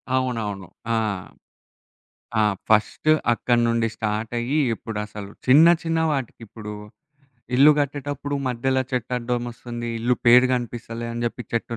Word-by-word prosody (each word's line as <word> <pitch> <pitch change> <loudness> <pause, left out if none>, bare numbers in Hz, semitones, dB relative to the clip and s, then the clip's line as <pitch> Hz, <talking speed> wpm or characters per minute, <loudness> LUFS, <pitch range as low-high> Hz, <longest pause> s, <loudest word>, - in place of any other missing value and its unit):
అవునవును. 110 -7 -2 0.3
ఆ! - - +2 1.4
ఆ! - - +5 0.3
ఫస్టు 110 +8 +3 0.2
అక్కడ్నుండి 115 -1 +1
స్టార్టయ్యి, 115 +6 -2 0.2
ఇప్పుడసలు 105 -2 -6 0.2
చిన్న, 145 +6 +7 0.2
చిన్న 165 0 0
వాటికి 135 -5 -3
ఇప్పుడు, 105 0 -8 0.8
ఇల్లు 145 +3 +8
గట్టేటప్పుడు 145 0 -3
మధ్యలో 130 +2 0
చెట్టడ్డమొస్తుంది. 120 -1 -3
ఇల్లు 120 +2 +1
పేరు 125 +2 +8
గనపిస్తలే 120 -1 -5
అని 120 0 -4
జెప్పి 120 +1 -5
చెట్టు 115 0 -2
120 Hz, 105 wpm, -23 LUFS, 115-130 Hz, 1.4 s, ఇల్లు